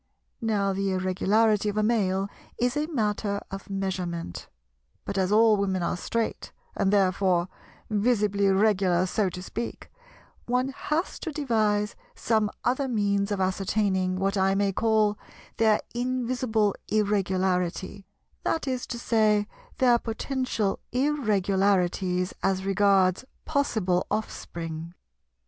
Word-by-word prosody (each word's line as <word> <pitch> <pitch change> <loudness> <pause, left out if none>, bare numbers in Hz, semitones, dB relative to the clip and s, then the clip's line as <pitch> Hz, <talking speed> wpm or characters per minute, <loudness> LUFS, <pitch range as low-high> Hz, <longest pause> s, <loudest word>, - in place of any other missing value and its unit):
Now 205 -3 +1
the 195 +1 -1
Irregularity 205 +3 +2
of 205 - -4
a 215 - +2
Male 200 -4 +1 0.3
is 245 +1 0
a 300 +1 0
matter 210 -7 -1
of 195 +1 -7
measurement; 180 - -4 0.6
but - - -4
as 190 0 +1
all 220 0 +5
Women 190 -2 0
are - - 0
straight, 225 +5 -3 0.2
and 195 - +1
therefore 185 -3 +2 0.4
visibly 210 -2 +2
Regular 190 -3 +3
so 195 +1 0
to 180 +1 -7
speak, 230 +4 -6 0.6
one 250 +2 +1
has 305 +5 -2
to 325 - -4
devise 215 -8 0 0.2
some 220 -2 +1
other 260 +3 +1
means 200 -3 0
of 200 - -1
ascertaining 190 0 0
what 195 +2 0
I 195 0 +3
may 200 0 +2
call 215 0 +2 0.4
their 220 -2 +4
invisible 245 -4 0
Irregularity, 190 -2 0 0.4
that 320 - -1
is 255 -2 -2
to 240 - -4
say 215 -3 +2 0.3
their 245 -2 +4
potential 230 -3 -2
Irregularities 195 -8 +1
as 190 0 0
regards 195 0 +3 0.2
possible 220 - 0
offspring. 170 -5 -5
205 Hz, 120 wpm, -26 LUFS, 190-225 Hz, 0.6 s, all